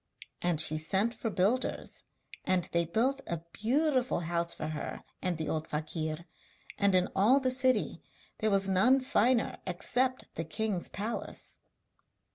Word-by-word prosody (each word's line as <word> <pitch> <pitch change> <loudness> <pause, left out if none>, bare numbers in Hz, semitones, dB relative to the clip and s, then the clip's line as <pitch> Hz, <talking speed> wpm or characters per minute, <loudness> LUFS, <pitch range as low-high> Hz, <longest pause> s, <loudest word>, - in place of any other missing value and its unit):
And 175 -3 +1
she 155 0 +3
sent 195 +8 +1
for 230 - -3
builders, 210 +6 -1 0.4
and 185 -1 +2
they 170 0 +2
built 250 +11 0
a 170 -2 -3
beautiful 255 - +1
house 170 0 -1
for 155 - -3
her 155 -1 -5 0.2
and 180 -3 -1
the 160 -1 -3
old 155 +1 -2
fakir, 155 +1 -4 0.5
and 200 -2 +4
in 180 0 +4
all 225 +8 +5
the 260 -2 +1
city 255 0 +2 0.4
there 215 - +1
was 195 -1 +3
none 205 +8 +4
finer 250 -1 +2
except 250 +8 +1
the 165 - -3
king's 180 +4 -1
palace. 215 +4 -5
195 Hz, 145 wpm, -30 LUFS, 170-250 Hz, 0.5 s, all